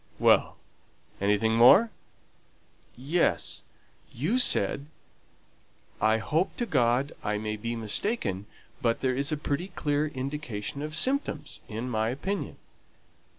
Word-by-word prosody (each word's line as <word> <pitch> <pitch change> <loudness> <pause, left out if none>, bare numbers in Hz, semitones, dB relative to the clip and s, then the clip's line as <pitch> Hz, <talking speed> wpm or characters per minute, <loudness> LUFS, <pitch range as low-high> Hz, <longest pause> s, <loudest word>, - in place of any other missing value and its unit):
'" - - -29
"Well. - - +4 0.6
Anything 105 +3 +2
more?" 160 - +7 1.1
"Yes; 150 +8 0 0.5
you 170 - 0
said, 145 - +1 1.1
'I 110 +1 +4
hope 150 - -1
to 240 - -1
God 130 - +2
I 105 0 0
may 105 0 -3
be 115 +3 -4
mistaken; 110 - -1 0.3
but 115 -3 +1
there 130 -1 +1
is 140 +4 0
a 155 - 0
pretty 145 +4 -2
clear 150 -5 -1
indication 135 -3 -5
of 155 +1 -4
symptoms, 275 +7 -1
in 115 +3 -4
my 110 -2 0
opinion.'" 180 +11 -3
130 Hz, 120 wpm, -28 LUFS, 110-155 Hz, 1.1 s, more